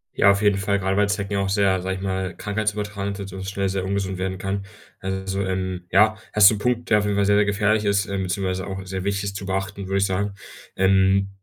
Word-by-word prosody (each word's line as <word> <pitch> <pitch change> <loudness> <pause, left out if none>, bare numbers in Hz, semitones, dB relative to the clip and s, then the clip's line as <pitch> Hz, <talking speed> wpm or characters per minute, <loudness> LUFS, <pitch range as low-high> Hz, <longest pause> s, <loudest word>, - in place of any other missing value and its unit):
Ja, 100 - +5
auf 100 +1 0
jeden 105 -2 +3
Fall, 100 +1 0
grade 95 +1 0
weil 105 - +3
Zecken 100 0 -2
ja 100 - +1
auch 100 - 0
sehr, 95 -2 +2
sage 95 +1 -2
ich 95 - -7
mal, 95 -1 -2
krankheitsübertragend 105 -1 -3
sind 100 -1 -7
und 95 0 -7
das 95 - -3
schnell 100 0 -1
sehr 95 0 -2
ungesund 95 -1 -2
werden 95 0 -3
kann. 100 +1 -3 0.3
Also, 95 0 -3
ähm, 95 -1 -3
ja, 110 +4 +4 0.2
hast 105 -1 +8
du 110 - 0
'n - - -5
Punkt, 120 +2 -1
der 105 -1 +5
auf 105 - -1
jeden 105 - 0
Fall 100 - +2
sehr, 100 0 +4
sehr 105 - +4
gefährlich 105 +1 +1
ist, 100 -1 +2
ähm, 100 -1 -2
beziehungsweise 95 0 -2
auch 95 0 -6
sehr 95 0 -5
wichtig 100 0 -1
ist 100 0 -3
zu 100 - -7
beachten, 95 0 -3
würde 100 0 0
ich 100 - +3
sagen. 100 +2 -1 0.4
Ähm, 95 +1 +3
100 Hz, 255 wpm, -23 LUFS, 95-100 Hz, 0.4 s, hast